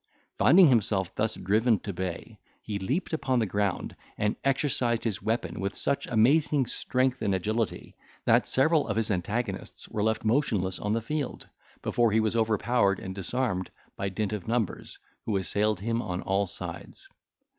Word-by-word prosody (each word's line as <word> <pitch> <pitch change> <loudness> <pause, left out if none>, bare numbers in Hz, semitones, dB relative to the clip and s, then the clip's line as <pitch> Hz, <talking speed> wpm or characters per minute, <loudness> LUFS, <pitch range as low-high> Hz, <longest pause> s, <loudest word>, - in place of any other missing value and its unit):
Finding 175 +5 +7
himself 100 -6 +1
thus 110 +2 -1
driven 110 +4 +2
to 100 +1 -6
bay, 90 -1 -5 0.2
he 105 -2 -3
leaped 140 - -2
upon 130 -5 0
the 115 - +2
ground, 100 -1 -1 0.2
and 105 0 0
exercised 130 -4 +1
his 105 -6 -2
weapon 110 0 -2
with 100 +1 -2
such 140 - -1
amazing 135 +4 +3
strength 130 +1 -1
and 100 - +1
agility, 110 +4 -2 0.3
that - - +4
several 155 +3 +3
of 105 -1 -2
his 115 -1 +1
antagonists 105 +6 -3
were 105 - -3
left 110 +1 0
motionless 110 -7 +1
on 105 +1 -1
the 115 - 0
field, 145 +2 -3 0.4
before 120 -2 +2
he 110 - +3
was 110 0 +1
overpowered 110 -2 +2
and 95 - -6
disarmed 95 -1 -2 0.3
by 100 - -2
dint 105 +2 -2
of 105 -2 -5
numbers, 115 -3 -2 0.3
who 105 -3 +1
assailed 105 +1 0
him 115 +2 0
on 90 -4 -4
all 100 +1 +1
sides. - - -7
110 Hz, 165 wpm, -28 LUFS, 100-125 Hz, 0.4 s, Finding